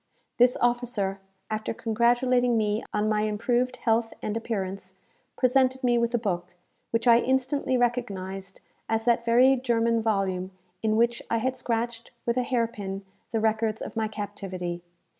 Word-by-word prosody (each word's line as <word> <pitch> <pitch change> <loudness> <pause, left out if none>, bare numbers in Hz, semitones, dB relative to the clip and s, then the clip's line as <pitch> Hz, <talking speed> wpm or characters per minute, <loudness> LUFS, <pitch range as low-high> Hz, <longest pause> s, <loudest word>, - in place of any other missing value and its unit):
This 245 +1 +5
officer, 240 -5 0 0.3
after 215 +1 -2
congratulating 240 +2 +2
me 210 0 0
on 210 0 0
my 215 -1 +2
improved 240 +4 0
health 225 -1 +1
and 210 - -2
appearance, 195 -4 -4 0.4
presented 260 +1 +3
me 240 -1 +3
with 235 0 +1
a - - +4
book, 180 -5 -3 0.3
which 230 +2 0
I 235 0 +8
instantly 260 +1 +1
recognized 195 -6 -2 0.3
as 225 0 0
that 235 -1 +2
very 250 +3 +6
German 230 -2 +1
volume 195 -4 0 0.3
in 215 -1 +1
which 235 +1 +2
I 230 - +2
had 260 +3 -1
scratched, 235 -1 -2 0.2
with 235 - +1
a 255 - +2
hair 245 -1 +1
pin, 200 -4 -6 0.2
the 225 - 0
records 220 0 +1
of - - -7
my 220 -1 0
captivity. 195 -4 -5
230 Hz, 155 wpm, -27 LUFS, 210-245 Hz, 0.4 s, I